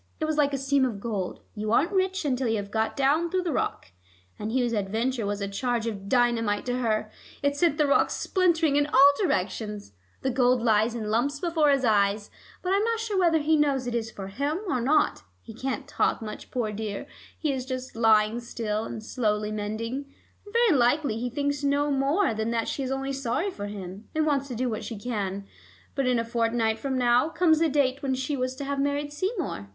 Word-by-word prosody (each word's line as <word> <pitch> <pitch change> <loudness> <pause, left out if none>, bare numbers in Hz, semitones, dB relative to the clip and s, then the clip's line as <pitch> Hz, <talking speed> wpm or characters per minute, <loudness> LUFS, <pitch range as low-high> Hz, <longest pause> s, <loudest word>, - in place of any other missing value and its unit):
It 315 - 0
was 310 0 0
like 290 -1 +3
a 275 - -1
seam 275 0 +2
of 235 -6 -1
gold: 200 -4 -3
you 215 0 -3
aren't 305 - +3
rich 380 -2 0
until 260 -2 0
you 225 - +1
have 200 -1 -4
got 220 +4 -1
down 295 +5 +2
through 370 +1 0
the 345 - -1
rock. 95 - -2 0.5
And 215 +1 -3
Hugh's 245 -1 +1
adventure 220 +3 -1
was 205 0 -2
a 200 - -1
charge 235 +3 -1
of 200 -3 -5
dynamite 235 -4 +2
to 250 0 -1
her; 215 -3 0 0.3
it 285 0 +2
sent 295 0 +2
the 300 - +3
rock 280 - +3
splintering 330 -6 +2
in 290 0 +2
all 280 0 +7
directions. 210 - -2 0.3
The 265 - +1
gold 250 -1 +3
lies 220 0 +3
in 215 -2 -3
lumps 280 +6 +1
before 325 -3 +2
his 275 -2 +3
eyes, 205 -1 +2 0.3
but 370 +1 +1
I - - +4
am 410 - +1
not 460 0 0
sure 435 -4 -1
whether 340 -3 +4
he 315 +1 +2
knows 280 -4 +2
it 245 - -3
is 230 -1 -1
for 195 -3 -8
him 280 +10 -1
or 255 -8 0
not. 285 +6 +2 0.2
He 225 - -10
can't 260 +4 -4
talk - - +1
much, 215 -2 -8
poor 235 -4 -2
dear; 210 -1 -4 0.3
he 300 -3 0
is 260 -1 -3
just 255 -1 -5
lying 220 0 +4
still, 225 -2 -3
and 220 - -6
slowly 210 -3 -1
mending, 230 +6 -4 0.3
and 410 - -12
very 465 -4 +4
likely 245 -1 +2
he 245 +1 -2
thinks 285 +2 -2
no 285 +1 +2
more 280 - +2
than 220 +1 -2
that 230 -1 -1
she - - -3
is 260 - -2
only 270 0 -2
sorry 275 +9 -1
for 205 - -6
him, 200 0 -8
and 310 0 +2
wants 280 -2 +1
to 250 - -5
do 250 +3 -1
what 220 -3 -3
she 225 - -6
can. 200 -3 -3 0.5
But 275 -2 0
in 250 -1 +3
a 230 - -1
fortnight 230 -1 0
from 265 0 -2
now 245 +3 +3
comes 325 -1 +3
the 330 -1 +3
date 275 -2 +1
when 265 -2 0
she 265 +3 -2
was 255 -1 -2
to 280 - -6
have 280 0 -2
married 285 +1 -1
Seymour. 345 - -3
255 Hz, 220 wpm, -26 LUFS, 220-285 Hz, 0.5 s, all